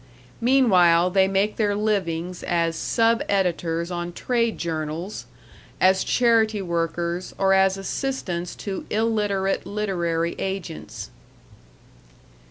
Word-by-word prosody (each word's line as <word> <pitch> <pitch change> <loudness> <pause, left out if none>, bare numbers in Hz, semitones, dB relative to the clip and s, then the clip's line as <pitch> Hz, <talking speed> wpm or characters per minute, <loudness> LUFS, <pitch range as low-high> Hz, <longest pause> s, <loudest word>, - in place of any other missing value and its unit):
Meanwhile 185 -9 +4
they 190 0 +4
make 195 +2 0
their 205 -2 +1
livings 185 -5 -1
as 170 -1 0
sub 230 +7 +1
editors 170 -3 0
on 175 0 -4
trade 235 +2 0
journals, 165 +3 -4 0.5
as 190 +1 +4
charity 225 -3 +2
workers, 170 0 -2
or 195 0 +3
as 190 0 +3
assistants 195 -5 -3
to 195 -2 -6
illiterate 210 -3 0
literary 170 -5 -1
agents. 190 -4 -5
190 Hz, 100 wpm, -23 LUFS, 170-210 Hz, 0.5 s, Meanwhile